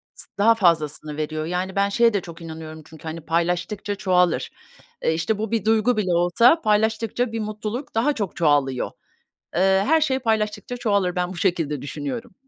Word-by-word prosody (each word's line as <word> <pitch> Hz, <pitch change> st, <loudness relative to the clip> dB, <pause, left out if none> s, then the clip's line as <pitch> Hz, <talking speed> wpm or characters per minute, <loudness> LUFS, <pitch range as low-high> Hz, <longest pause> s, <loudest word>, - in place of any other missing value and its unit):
s -, -, -12 dB
daha 225 Hz, +3 st, +5 dB
fazlasını 155 Hz, -5 st, +1 dB
veriyor. 155 Hz, 0 st, -3 dB
Yani 180 Hz, +2 st, -3 dB
ben 200 Hz, 0 st, +2 dB
şeye 230 Hz, +2 st, +3 dB
de 200 Hz, -, 0 dB
çok 170 Hz, 0 st, -11 dB
inanıyorum 160 Hz, -1 st, -8 dB
çünkü, 160 Hz, -1 st, -15 dB
hani, 160 Hz, +1 st, -6 dB
paylaştıkça 175 Hz, +6 st, -1 dB
çoğalır. 180 Hz, -3 st, +1 dB, 0.5 s
Eee, 160 Hz, -, +2 dB
işte 165 Hz, +7 st, -1 dB
bu 220 Hz, 0 st, -3 dB
bir 225 Hz, -3 st, 0 dB
duygu 220 Hz, +1 st, +3 dB
bile 185 Hz, -4 st, 0 dB
olsa, 175 Hz, -, +4 dB
paylaştıkça 220 Hz, +2 st, +1 dB
bir 225 Hz, -, -3 dB
mutluluk 215 Hz, +4 st, -5 dB
daha 270 Hz, +7 st, +2 dB
çok 205 Hz, -8 st, -4 dB
çoğalıyor. 145 Hz, -5 st, +1 dB, 0.7 s
Eee, 190 Hz, +1 st, +3 dB
her 320 Hz, +2 st, +4 dB
şey 265 Hz, -4 st, +1 dB
paylaştıkça 220 Hz, 0 st, -1 dB
çoğalır, 200 Hz, -7 st, 0 dB
ben 180 Hz, 0 st, 0 dB
bu -, -, -9 dB
şekilde 165 Hz, -7 st, 0 dB
düşünüyorum. 245 Hz, -, -5 dB
195 Hz, 175 wpm, -23 LUFS, 165-225 Hz, 0.7 s, daha